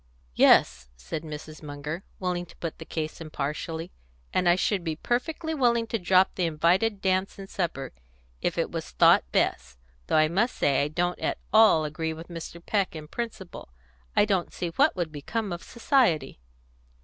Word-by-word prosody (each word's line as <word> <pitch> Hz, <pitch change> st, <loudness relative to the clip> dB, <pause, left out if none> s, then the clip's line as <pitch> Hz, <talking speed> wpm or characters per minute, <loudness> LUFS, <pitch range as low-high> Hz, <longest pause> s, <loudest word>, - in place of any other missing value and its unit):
"Yes," 60 Hz, +1 st, +4 dB
said 65 Hz, -, -5 dB
Mrs. 155 Hz, 0 st, -8 dB
Munger, 150 Hz, +4 st, -6 dB, 0.2 s
willing 180 Hz, -1 st, -2 dB
to -, -, -17 dB
put 165 Hz, -2 st, -5 dB
the 160 Hz, -, -8 dB
case 155 Hz, 0 st, -4 dB
impartially; 160 Hz, +2 st, -4 dB, 0.4 s
"and 180 Hz, -1 st, +3 dB
I 175 Hz, -, +6 dB
should 190 Hz, 0 st, 0 dB
be 160 Hz, -2 st, -2 dB
perfectly 315 Hz, -, -2 dB
willing 240 Hz, -5 st, +2 dB
to 225 Hz, 0 st, -2 dB
drop 185 Hz, +1 st, +4 dB
the 180 Hz, -2 st, 0 dB
invited 180 Hz, +7 st, +2 dB
dance 190 Hz, 0 st, 0 dB
and 195 Hz, -1 st, -8 dB
supper, 170 Hz, -8 st, -3 dB, 0.5 s
if -, -, -1 dB
it -, -, 0 dB
was -, -, -5 dB
thought -, -, +4 dB
best, 60 Hz, +1 st, 0 dB, 0.3 s
though -, -, +2 dB
I 155 Hz, 0 st, +5 dB
must 205 Hz, +10 st, 0 dB
say 140 Hz, -1 st, +2 dB
I 145 Hz, -, +1 dB
don't 175 Hz, +3 st, -1 dB
at -, -, -1 dB, 0.2 s
all 215 Hz, -8 st, +6 dB
agree 160 Hz, +2 st, -3 dB
with 165 Hz, +2 st, -10 dB
Mr. 170 Hz, 0 st, -8 dB
Peck 200 Hz, -5 st, 0 dB
in 155 Hz, -1 st, -8 dB
principle. 215 Hz, -, -6 dB, 0.5 s
I -, -, +5 dB
don't 195 Hz, -4 st, 0 dB
see 175 Hz, -, -3 dB
what 280 Hz, -, +3 dB
would 175 Hz, -4 st, -2 dB
become 195 Hz, +7 st, -3 dB
of 170 Hz, -, -6 dB
society." 235 Hz, -, +1 dB
170 Hz, 175 wpm, -27 LUFS, 155-195 Hz, 0.5 s, I